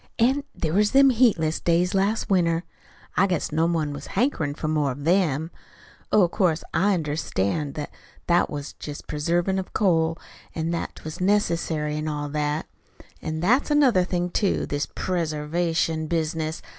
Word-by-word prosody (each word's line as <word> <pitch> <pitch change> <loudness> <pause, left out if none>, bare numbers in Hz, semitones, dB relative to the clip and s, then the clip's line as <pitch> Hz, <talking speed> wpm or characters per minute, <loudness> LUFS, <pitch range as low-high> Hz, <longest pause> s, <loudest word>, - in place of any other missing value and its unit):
An' 265 +5 +2
there 160 -1 -2
was 210 +2 +3
them 275 0 +7
heatless 205 -11 +2
days 175 +1 +1
last 200 +3 +1
winter 170 -3 +2 0.5
I 195 - +4
guess 180 -4 -1
no 160 +2 +2
one 160 -4 -1
was 145 0 -8
hankerin' 185 - 0
for 155 - -4
more 150 -2 +1
of 140 +3 -7
THEM. 165 -2 +1 0.6
Oh, 200 -4 +5
'course 170 -3 0
I 200 +2 +3
understand 150 - -2
that 150 - -5 0.3
that 175 0 +3
was 145 -1 -6
just 145 -1 -8
preservation 175 +5 0
of 185 - -7
coal, 165 -5 +2 0.4
an' 165 +1 -1
that 170 - -3
'twas 155 +3 -8
necessary, 170 -6 +1
an' 155 +1 -3
all 145 -1 -3
that. 150 +1 -1 0.6
An' 160 0 -3
that's 245 - +3
another 270 -10 +4
thing, 180 -1 -2
too 200 +1 +1
this 145 0 -2
preservation 165 -1 -1
business. 160 -1 -2
165 Hz, 155 wpm, -24 LUFS, 155-185 Hz, 0.6 s, them